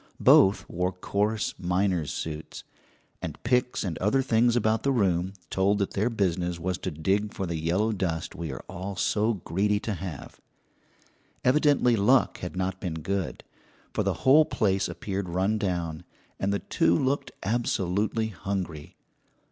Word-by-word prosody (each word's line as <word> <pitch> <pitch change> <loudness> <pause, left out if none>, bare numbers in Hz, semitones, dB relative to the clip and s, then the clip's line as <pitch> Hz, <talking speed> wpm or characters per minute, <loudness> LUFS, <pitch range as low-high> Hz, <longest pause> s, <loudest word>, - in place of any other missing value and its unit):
Both 95 +1 +5
wore 90 +1 -1
coarse 100 +4 -1
miner's 90 -4 0
suits, 80 0 -6 0.6
and - - -5
picks 125 0 +1
and 90 -6 -3
other 105 +8 +2
things 120 -1 +3
about 110 -1 +2
the 140 - +1
room 95 -6 +1 0.2
told 100 +2 +2
that 100 -1 -1
their 105 +5 0
business 90 -5 -1
was 90 +1 -2
to - - -3
dig 95 +7 -1
for 95 - -2
the 85 -1 -3
yellow 90 +8 +1
dust 90 -6 -2
we 80 -3 -5
are - - -7
all 95 +2 -5
so 110 +4 +1
greedy 100 +3 0
to 110 - -2
have. 90 -6 -7 1.0
Evidently 135 -3 +4
luck 115 +6 +3
had 90 +1 -6
not 95 0 -2
been 90 -5 -3
good, 95 +2 -3 0.5
for - - 0
the - - +1
whole 145 +4 +8
place 95 -9 0
appeared 95 +2 -4
run 95 +5 +1
down, 85 -5 -2 0.4
and 95 - 0
the 100 - +1
two 85 -3 +2
looked 135 +2 0
absolutely 110 0 0
hungry. 90 -6 -5
95 Hz, 155 wpm, -27 LUFS, 90-110 Hz, 1.0 s, whole